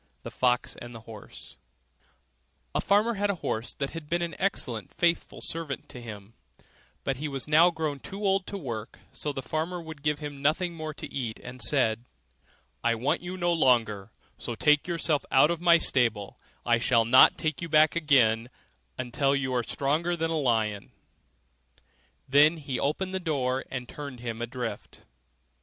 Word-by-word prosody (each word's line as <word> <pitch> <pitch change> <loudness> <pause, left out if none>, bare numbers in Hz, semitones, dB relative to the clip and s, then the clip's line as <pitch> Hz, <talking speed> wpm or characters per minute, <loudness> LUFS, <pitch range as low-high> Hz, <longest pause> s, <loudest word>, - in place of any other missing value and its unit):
THE - - -7
FOX 125 -1 +1
AND 120 0 -9
THE 115 - -9
HORSE 110 -2 -11 1.2
A - - +1
farmer 210 +4 +3
had 205 -1 -1
a 200 - +1
horse 110 +2 -1
that 140 -1 -3
had 165 -3 -8
been 175 0 0
an 170 -1 -3
excellent 120 - -1
faithful 170 -1 0
servant 160 -6 -2
to 125 - -8
him: 105 -2 -10 0.7
but 135 -1 -1
he 150 +3 -3
was 135 -1 -4
now 160 +3 +6
grown 155 -4 -3
too 200 +8 -6
old 195 -1 +2
to 200 - -4
work; 115 - -6 0.2
so 150 - -3
the 135 -2 -5
farmer 160 +8 -2
would 160 -3 -9
give 150 0 0
him 145 -2 -7
nothing 165 +5 +1
more 155 -2 -6
to - - -9
eat, 120 -5 -3
and 125 0 -8
said, 115 -5 +2 0.8
'I 115 0 +2
want 120 +5 0
you 180 +1 -6
no 175 -1 +1
longer, 115 -9 +2 0.3
so 120 - -5
take 150 +6 +3
yourself 165 -4 0
off - - -27
out 135 +4 +6
of 170 -1 -3
my 170 -1 +6
stable; 115 -10 0 0.3
I 120 -1 +3
shall 115 -1 +3
not 125 +3 +7
take 155 -1 -2
you 170 - -4
back 155 +1 +5
again 125 -8 +3 0.5
until 135 +2 0
you 135 -2 -1
are 125 - +2
stronger 155 +8 -1
than 165 0 -1
a 160 - 0
lion.' 110 -6 0 1.3
Then 150 +4 +5
he 140 -4 -4
opened 185 +6 -1
the 190 - 0
door 135 -6 -1
and 125 -2 -5
turned 140 -3 -8
him 115 -1 -5
adrift. 120 0 -5
140 Hz, 180 wpm, -27 LUFS, 120-165 Hz, 1.3 s, not